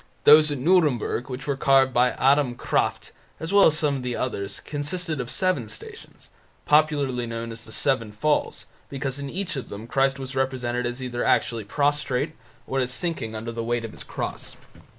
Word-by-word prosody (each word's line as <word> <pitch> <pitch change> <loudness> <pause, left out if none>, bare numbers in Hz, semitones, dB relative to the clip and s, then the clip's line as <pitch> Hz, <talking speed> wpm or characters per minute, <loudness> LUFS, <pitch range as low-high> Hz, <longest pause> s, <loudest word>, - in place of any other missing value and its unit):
Those 150 +1 +8
at 145 - -2
Nuremburg, 140 -5 +2
which 130 +1 -6
were 140 - 0
carved 135 -1 +4
by 125 +1 +3
Adam 135 -2 +3
Krafft, - - -1 0.3
as 165 +4 -4
well 200 -1 +7
as 155 - +2
some 145 -3 +1
of - - -5
the 125 -1 -3
others, 100 -6 -3
consisted 155 +1 -3
of 125 - -6
seven 180 - 0
Stations, - - -12 0.4
popularly 145 -5 +2
known 115 0 -5
as 115 0 -8
"the 110 - -12
Seven 115 -4 0
Falls", 145 +8 -1 0.2
because 135 -1 -4
in 140 -1 -5
each 185 +2 -3
of 135 - -5
them 105 +2 -7
Christ 135 +3 +1
was 130 0 -7
represented 125 -2 -1
either 125 -2 -3
as - - +1
actually 115 -3 +1
prostrate 145 +2 0 0.3
or 135 - -1
as 130 -1 0
sinking 130 -5 -2
under 115 +2 -5
the 115 0 -4
weight 120 0 -1
of 110 - -7
His - - -9
cross. - - -5
130 Hz, 190 wpm, -25 LUFS, 120-145 Hz, 0.4 s, Those